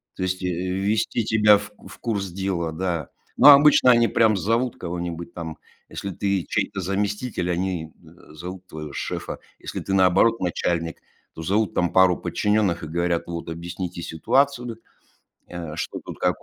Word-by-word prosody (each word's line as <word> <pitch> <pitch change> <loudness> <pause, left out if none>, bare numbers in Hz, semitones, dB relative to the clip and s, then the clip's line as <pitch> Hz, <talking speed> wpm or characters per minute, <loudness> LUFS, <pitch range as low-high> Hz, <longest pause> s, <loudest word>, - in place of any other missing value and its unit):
то - - -4
есть 95 0 -2
ввести 95 +6 0
тебя 105 -2 +5
в 100 +1 -8
в - - -13
курс 105 -5 -2
дела, 90 -3 -2
да. 85 -3 -3 0.3
Но - - +9
обычно 140 -2 +7
они 120 -1 +5
прям 110 -3 +3
зовут 115 +5 0
кого-нибудь 85 -1 -5
там. 80 -2 -6 0.3
Если 100 - -5
ты 100 -1 -1
чей-то 100 - -1
заместитель, 100 +1 -2
они, 85 -3 -2
э, 80 -1 -17
зовут 90 +3 -8
твоего 75 -3 -8
шефа. - - -4 0.2
Если - - -5
ты, 95 - -3
наоборот, 95 +5 +4
начальник, 85 -2 -1 0.4
то 80 - -8
зовут 100 +3 +1
там 90 -1 +1
пару 95 -2 +5
подчинённых 105 -5 0
и - - -5
говорят: 85 +1 0
"Вот, 85 -1 -5
объясните 85 +1 -5
ситуацию, 125 - 0 0.7
э, 85 -3 -7
что - - -4
тут - - -8
как - - 0
90 Hz, 155 wpm, -23 LUFS, 85-105 Hz, 0.7 s, Но